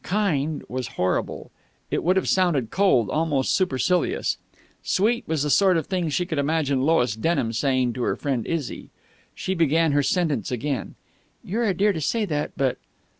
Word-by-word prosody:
"Kind" 160 Hz, -7 st, 0 dB
was 125 Hz, 0 st, -4 dB
horrible. 90 Hz, 0 st, -1 dB, 0.4 s
It -, -, 0 dB
would 180 Hz, +3 st, +3 dB
have 190 Hz, -, +1 dB
sounded 170 Hz, -, +1 dB
cold, 180 Hz, -, +3 dB
almost 150 Hz, -4 st, +1 dB
supercilious. 185 Hz, -, 0 dB, 0.4 s
"Sweet" 230 Hz, +5 st, +1 dB
was 160 Hz, -3 st, 0 dB
the 150 Hz, -, 0 dB
sort 190 Hz, 0 st, +4 dB
of 160 Hz, -, -2 dB
thing 180 Hz, -4 st, -1 dB
she 175 Hz, +4 st, 0 dB
could 160 Hz, -4 st, -2 dB
imagine 140 Hz, -2 st, +1 dB
Lois 130 Hz, -7 st, +2 dB
Denham 115 Hz, -2 st, 0 dB
saying 130 Hz, 0 st, +1 dB
to 125 Hz, -, -5 dB
her -, -, 0 dB
friend 130 Hz, -6 st, -2 dB
Izzy. 165 Hz, -5 st, -4 dB, 0.5 s
She 190 Hz, -, -2 dB
began 165 Hz, -2 st, +2 dB
her 145 Hz, 0 st, +3 dB
sentence 145 Hz, -, 0 dB
again. 130 Hz, +2 st, -3 dB, 0.5 s
"You're 230 Hz, +6 st, -1 dB
a 195 Hz, -4 st, +1 dB
dear 205 Hz, +3 st, +2 dB
to 160 Hz, -, -4 dB
say 220 Hz, +9 st, 0 dB
that, 150 Hz, -5 st, -2 dB
but...." 135 Hz, -2 st, 0 dB
155 Hz, 175 wpm, -24 LUFS, 135-185 Hz, 0.5 s, sort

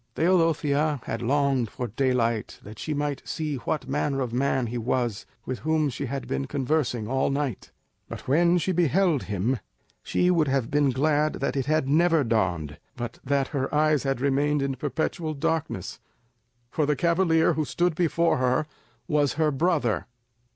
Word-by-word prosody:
Teodosia 155 Hz, -4 st, +2 dB
had 115 Hz, -, -4 dB
longed 135 Hz, -2 st, +1 dB
for 125 Hz, -, -5 dB
daylight 120 Hz, -2 st, 0 dB
that 105 Hz, +1 st, -11 dB
she 155 Hz, -, -4 dB
might 145 Hz, -1 st, -2 dB
see 155 Hz, -3 st, -3 dB
what 130 Hz, +2 st, -3 dB
manner 140 Hz, 0 st, -1 dB
of 120 Hz, -3 st, -3 dB
man 130 Hz, 0 st, +1 dB
he 120 Hz, +1 st, -4 dB
was 120 Hz, -2 st, -1 dB, 0.2 s
with 130 Hz, -1 st, -4 dB
whom 155 Hz, -1 st, +1 dB
she 140 Hz, +3 st, -4 dB
had 135 Hz, +1 st, -4 dB
been 70 Hz, +1 st, -2 dB
conversing 130 Hz, -5 st, -1 dB
all 135 Hz, +2 st, +1 dB
night; 140 Hz, -5 st, -2 dB, 0.4 s
but -, -, -8 dB
when 170 Hz, +6 st, +4 dB
she 180 Hz, +2 st, 0 dB
beheld 175 Hz, -2 st, +2 dB
him, 105 Hz, +5 st, -1 dB, 0.4 s
she 180 Hz, 0 st, +1 dB
would 165 Hz, -4 st, +2 dB
have 135 Hz, -3 st, 0 dB
been 145 Hz, -1 st, +3 dB
glad 150 Hz, +3 st, +1 dB
that 140 Hz, -, -2 dB
it 135 Hz, -1 st, -1 dB
had 155 Hz, -3 st, +1 dB
never 165 Hz, +1 st, +3 dB
dawned, 90 Hz, -, -1 dB, 0.2 s
but 120 Hz, -1 st, -6 dB
that 140 Hz, 0 st, 0 dB
her 135 Hz, -3 st, -2 dB
eyes 155 Hz, -1 st, +3 dB
had 135 Hz, -2 st, -1 dB
remained 140 Hz, +1 st, +1 dB
in 140 Hz, -1 st, -1 dB
perpetual 155 Hz, +3 st, -2 dB
darkness, 160 Hz, -, -2 dB, 0.7 s
for 150 Hz, -3 st, 0 dB
the 150 Hz, -, +2 dB
cavalier 170 Hz, +1 st, +3 dB
who 155 Hz, -, 0 dB
stood 175 Hz, +3 st, 0 dB
before 170 Hz, 0 st, +1 dB
her 130 Hz, +3 st, +1 dB, 0.4 s
was 145 Hz, -2 st, +2 dB
her 155 Hz, 0 st, +1 dB
brother! 145 Hz, -7 st, 0 dB
140 Hz, 165 wpm, -26 LUFS, 125-155 Hz, 0.7 s, when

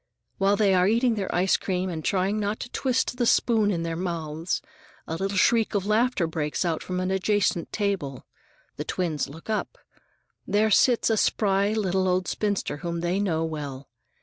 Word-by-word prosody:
While 195 Hz, +1 st, +3 dB
they 205 Hz, -2 st, +3 dB
are 180 Hz, 0 st, +4 dB
eating 235 Hz, +3 st, +3 dB
their 200 Hz, -3 st, -3 dB
icecream 185 Hz, 0 st, +1 dB
and 160 Hz, -2 st, -5 dB
trying 195 Hz, +2 st, 0 dB
not 210 Hz, +1 st, -2 dB
to -, -, -6 dB
twist 255 Hz, -1 st, 0 dB
the 240 Hz, -2 st, +1 dB
spoon 220 Hz, -4 st, +3 dB
in 170 Hz, -4 st, -1 dB
their 165 Hz, 0 st, -3 dB
mouths, 165 Hz, -2 st, -3 dB, 0.5 s
a 160 Hz, -, -4 dB
little 195 Hz, +3 st, -2 dB
shriek 225 Hz, +1 st, +3 dB
of 200 Hz, -1 st, 0 dB
laughter 215 Hz, -2 st, +2 dB
breaks 160 Hz, +1 st, -2 dB, 0.2 s
from 180 Hz, 0 st, -3 dB
an 185 Hz, +1 st, -1 dB
adjacent 190 Hz, -2 st, 0 dB
table. 190 Hz, -, -2 dB, 0.5 s
The -, -, -3 dB
twins 160 Hz, -7 st, -2 dB
look 160 Hz, +4 st, -12 dB
up. 220 Hz, -, -2 dB, 0.7 s
There 210 Hz, +2 st, +2 dB
sits 235 Hz, +2 st, +4 dB
a 220 Hz, -, +2 dB
spry 200 Hz, 0 st, +2 dB
little 190 Hz, -3 st, 0 dB
old 185 Hz, 0 st, +1 dB
spinster 205 Hz, -7 st, -1 dB
whom 170 Hz, +2 st, -4 dB
they 175 Hz, +3 st, 0 dB
know 165 Hz, -5 st, 0 dB
well. 145 Hz, -4 st, -6 dB
190 Hz, 175 wpm, -26 LUFS, 170-210 Hz, 0.7 s, are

